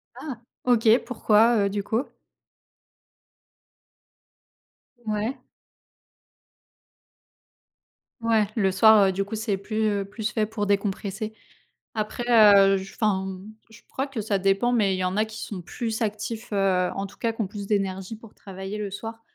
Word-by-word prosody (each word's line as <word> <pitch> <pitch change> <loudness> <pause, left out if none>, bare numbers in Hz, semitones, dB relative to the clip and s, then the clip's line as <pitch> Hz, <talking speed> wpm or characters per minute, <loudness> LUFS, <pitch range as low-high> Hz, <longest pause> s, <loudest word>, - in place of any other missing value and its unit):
Ah, 265 -7 -7 0.3
OK. 235 -1 +5
Pourquoi, 230 -1 +3
heu, - - +1
du 200 0 -3
coup? 235 +6 -1 3.0
Ouais. 215 +5 -2 2.8
Ouais! 225 -2 +2
Le 195 -4 +2
soir, 210 +2 +6
heu, 190 - +2
du 195 +1 -1
coup, 205 +3 -6
c'est 215 -2 -1
plus 215 +3 -2
heu 200 -1 0
plus 220 +3 -4
fait 215 -2 0
pour 215 -1 -3
décompresser. 200 +1 -2 0.6
Après 215 +2 -3
heu, 200 -4 +7
j 190 0 -7
enfin, 200 -4 0
mmh, 190 +3 -8 0.2
je 220 0 -16
crois 270 +2 -3
que 265 -5 -4
ça 200 -1 -1
dépend, 195 +5 +2
mais 205 -6 +2
il - - -4
y 185 - -2
en 185 +1 -1
a 215 - +3
qui 220 0 -9
sont 195 -4 -6
plus 225 +5 -4
actifs, 220 +2 -3
heu, 190 -2 +2
en 195 - -3
tout 195 - -12
cas 230 - 0
qui 225 - -4
ont 205 - -1
plus 200 0 -7
d'énergie 195 0 -2
pour 225 -1 -15
travailler 195 +2 -7
le 205 - -3
soir. 225 +3 -7
210 Hz, 160 wpm, -25 LUFS, 195-225 Hz, 3.0 s, heu